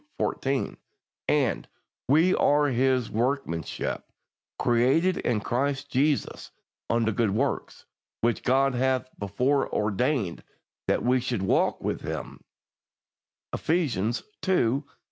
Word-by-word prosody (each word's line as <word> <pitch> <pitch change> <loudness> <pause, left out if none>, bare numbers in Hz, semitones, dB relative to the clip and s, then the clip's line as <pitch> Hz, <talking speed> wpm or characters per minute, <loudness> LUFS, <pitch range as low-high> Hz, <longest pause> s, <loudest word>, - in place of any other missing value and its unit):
14); 135 0 -1 0.5
and - - +1 0.4
"we 160 +7 +4
are 145 0 +3
His 130 -1 +1
workmanship, 115 - -2 0.5
created 135 +10 +3
in 115 -3 0
Christ 140 +5 -1
Jesus 140 +2 0 0.4
unto 115 -1 +2
good 110 0 +1
works, 125 +8 -2 0.4
which 120 0 +1
God 135 +1 +3
hath 130 0 +1
before 125 +8 0
ordained 105 - 0 0.4
that - - +1
we 125 +1 +3
should 120 -5 -2
walk 95 - +2
in - - -1
them" - - -6 1.1
(Eph. - - -5
ii. 140 - 0
130 Hz, 105 wpm, -27 LUFS, 115-140 Hz, 1.1 s, we